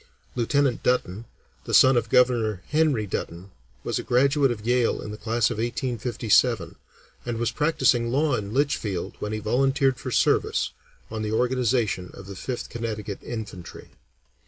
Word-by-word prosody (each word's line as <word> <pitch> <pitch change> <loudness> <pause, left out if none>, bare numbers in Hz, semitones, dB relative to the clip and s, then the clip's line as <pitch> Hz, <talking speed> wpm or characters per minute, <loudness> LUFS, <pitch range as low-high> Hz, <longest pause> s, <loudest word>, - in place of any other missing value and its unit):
Lieutenant 130 +1 +1
Dutton, 115 -4 0 0.4
the - - +1
son 130 0 +7
of 115 -2 0
Governor 115 -6 +2
Henry 150 -8 +2
Dutton, 90 0 -5 0.3
was - - -2
a - - -5
graduate 135 +3 +3
of 110 -3 -4
Yale 120 0 +2
in 105 - -6
the - - -6
class 110 +1 0
of - - -4
1857, 120 -3 0 0.5
and 120 -1 -3
was 115 0 0
practising 130 -4 +2
law 145 +4 +1
in 100 -1 -4
Litchfield 110 -9 -1
when 105 - -4
he 110 - -2
volunteered 135 +4 +1
for 130 - -5
service 115 -2 +1 0.4
on 110 -1 -4
the 105 0 -2
organization 120 -6 0
of - - -11
the 100 0 -8
Fifth 125 +6 -5
Connecticut 110 -3 -5
Infantry. 105 -7 -8
120 Hz, 155 wpm, -25 LUFS, 105-130 Hz, 0.5 s, son